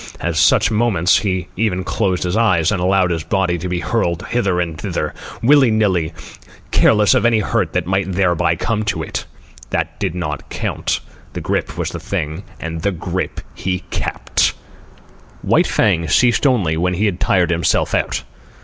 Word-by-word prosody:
At 85 -1 -2
such 110 - +4
moments 105 -6 +3
he 95 -3 -2
even 95 -3 0
closed 95 -1 -1
his 90 +2 -1
eyes 95 -7 +3
and 100 -4 -1
allowed 95 0 +2
his 80 -2 -2
body 95 -4 0
to 90 +2 -4
be 90 -1 -2
hurled 90 -6 -1
hither 100 -7 0
and 85 -2 -2
thither, - - -3 0.3
willy 135 0 +6
nilly, 95 -7 +1 0.6
careless 105 -2 +4
of - - +2
any 120 -1 +4
hurt 105 -5 0
that 90 -1 0
might 95 +1 0
thereby 90 -2 +2
come 115 -3 -1
to 80 -6 -1
it. - - -4 0.4
That - - -2
did 80 - -2
not 75 -5 -4
count. - - -2 0.3
The - - -5
grip - - -2
was - - -2
the - - -6
thing, 80 +4 -3 0.2
and 80 0 -5
the 100 - +1
grip 85 - -4
he 90 -1 -3
kept. - - 0 0.9
White - - +3
Fang 85 0 +1
ceased 120 - +3
only 95 -12 +1
when 90 +2 0
he 105 +5 +1
had 95 -4 -1
tired 90 -2 +2
himself 85 -2 +1
out. - - 0
90 Hz, 175 wpm, -18 LUFS, 85-105 Hz, 0.9 s, willy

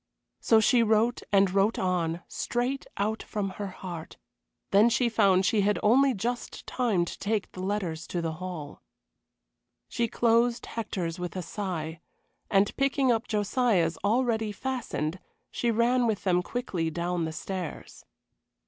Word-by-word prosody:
So 225 - +4
she 235 +2 +4
wrote 225 +2 +2
and 195 -2 +4
wrote 200 +3 +2
on, 175 -2 -1
straight 250 +3 -2
out 215 +2 -1
from 200 -3 -3
her 200 - -2
heart, 180 -3 -8 0.5
then 205 +4 +6
she 235 +1 +2
found 195 -4 +3
she 215 0 +3
had 205 +1 +2
only 260 +4 +5
just 240 +5 -4
time 220 -9 +1
to - - -8
take 210 0 -1
the - - -10
letters 185 -5 -2
to 175 - -3
the 165 -1 -1
hall. 175 -6 -6 1.1
She 235 - -1
closed 235 +1 +2
Hector's 180 -7 -4
with 180 +1 -5
a 185 - -3
sigh, 165 -5 -4 0.5
and 195 0 +3
picking 275 -1 +2
up 230 -1 0
Josiah's, 205 -5 +1
already 225 0 +1
fastened, 205 - -3 0.3
she 240 - -1
ran 235 +2 +3
with 215 -3 -1
them 180 -2 +3
quickly 180 -7 -2
down 170 +1 -2
the 160 - -3
stairs. 180 +1 -6
205 Hz, 150 wpm, -28 LUFS, 180-235 Hz, 1.1 s, then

